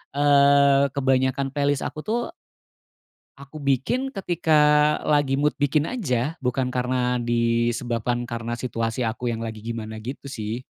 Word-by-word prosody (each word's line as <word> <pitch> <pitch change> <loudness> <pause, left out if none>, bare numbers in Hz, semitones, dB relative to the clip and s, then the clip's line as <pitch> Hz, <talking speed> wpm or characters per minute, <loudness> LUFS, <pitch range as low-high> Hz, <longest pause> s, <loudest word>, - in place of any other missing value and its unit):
eee, 140 -1 +5
kebanyakan 135 0 +1
playlist 145 -1 0
aku 155 - -5
tuh 235 +2 -1 1.1
aku 140 +2 -11
bikin 145 - -1
ketika 175 -4 -1 0.6
lagi 145 -2 +2
mood 150 - +1
bikin 145 +2 +1
aja. 155 - -2
Bukan 125 0 -1
karena 125 0 0
disebabkan 120 0 -1
karena 115 0 -4
situasi 115 0 -3
aku 115 +1 -2
yang 115 - -5
lagi 110 -1 -5
gimana 110 -1 -5
gitu 130 +5 -7
sih. 115 0 -5
130 Hz, 130 wpm, -24 LUFS, 120-145 Hz, 1.1 s, eee